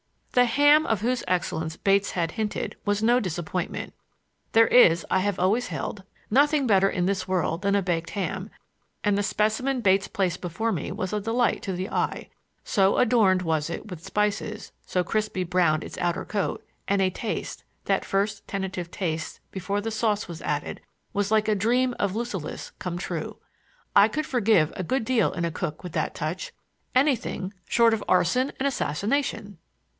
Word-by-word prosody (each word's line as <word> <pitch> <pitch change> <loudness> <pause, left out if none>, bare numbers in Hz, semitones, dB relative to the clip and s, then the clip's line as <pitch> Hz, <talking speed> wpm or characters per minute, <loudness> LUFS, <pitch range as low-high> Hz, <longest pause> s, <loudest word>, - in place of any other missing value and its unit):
The 250 0 +5
ham 290 +5 +5
of 220 -4 0
whose 245 +2 0
excellence 160 -3 -1
Bates 200 +1 +2
had 165 -2 -1
hinted 215 0 -3
was 205 +1 0
no 240 +2 +5
disappointment. 180 -2 -3 0.6
There 225 0 +7
is, 170 -9 +5
I 190 - +4
have 200 0 0
always 215 +7 +1
held, 200 - -5 0.3
nothing 290 +3 +4
better 195 -4 +4
in 180 -2 -1
this 190 -1 -1
world 180 -2 0
than 200 0 +2
a 200 - +2
baked 170 -2 -1
ham, 200 -3 -3 0.5
and 205 -1 +2
the 205 - +1
specimen 240 +6 0
Bates 195 -2 +3
placed 185 -5 -1
before 190 +6 -2
me - - -3
was 185 -1 -3
a 210 - +1
delight 230 +3 +1
to 190 - -3
the 185 +1 -3
eye,—so 195 -2 -1
adorned 220 -7 +4
was 160 -3 0
it 190 +4 -6
with 165 -2 -8
spices, 210 +2 -2
so 180 - 0
crisply 210 0 -1
brown 170 -3 +2
its - - -8
outer 175 -1 0
coat; 205 -2 -2 0.2
and 200 0 +2
a 190 - +3
taste—that 215 +3 -3
first 200 +1 -1
tentative 190 -3 -4
taste, 160 -5 -4
before 195 +2 -2
the 225 +2 -3
sauce 215 -1 0
was 170 -2 -8
added—was 190 +6 -4
like 220 0 +2
a - - +4
dream 245 +5 +2
of 200 -1 0
Lucullus 220 -9 -4
come 180 -1 -4
true. 175 - -4 0.6
I - - +8
could 305 0 -2
forgive 210 - +2
a 185 - -3
good 260 +7 0
deal 235 -3 +2
in 170 - -3
a 170 - -1
cook 155 0 -4
with 180 - -6
that - - -2
touch,—anything 260 - -2
short 230 -1 +4
of 220 - -1
arson 185 +10 +2
and 265 - -1
assassination! 215 - -1
200 Hz, 170 wpm, -26 LUFS, 180-225 Hz, 0.6 s, I